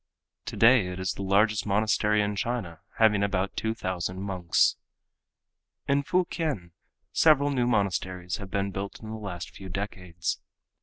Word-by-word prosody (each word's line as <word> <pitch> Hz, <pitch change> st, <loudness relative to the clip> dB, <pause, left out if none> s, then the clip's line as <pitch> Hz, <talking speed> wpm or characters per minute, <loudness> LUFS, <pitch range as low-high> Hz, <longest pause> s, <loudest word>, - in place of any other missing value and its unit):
Today 115 Hz, -4 st, +5 dB
it 90 Hz, 0 st, -5 dB
is 95 Hz, -1 st, -1 dB
the -, -, -7 dB
largest 105 Hz, +2 st, +2 dB
monastery 105 Hz, +1 st, +2 dB
in 105 Hz, 0 st, -2 dB
China, 100 Hz, -6 st, -3 dB, 0.2 s
having 105 Hz, -3 st, +4 dB
about 100 Hz, -1 st, 0 dB
two 110 Hz, 0 st, -1 dB
thousand 95 Hz, -2 st, -3 dB
monks. 95 Hz, -3 st, +2 dB, 1.1 s
In 140 Hz, 0 st, +3 dB
Fukien 155 Hz, -, -1 dB, 0.4 s
several 145 Hz, -2 st, +4 dB
new 125 Hz, -3 st, +1 dB
monasteries 95 Hz, -5 st, -1 dB
have 100 Hz, -2 st, -8 dB
been 100 Hz, +1 st, -1 dB
built 100 Hz, +1 st, -5 dB
in 110 Hz, -1 st, -8 dB
the -, -, -4 dB
last 95 Hz, -5 st, -6 dB
few 95 Hz, -1 st, -10 dB
decades. 90 Hz, -3 st, -4 dB
100 Hz, 145 wpm, -27 LUFS, 95-110 Hz, 1.1 s, Today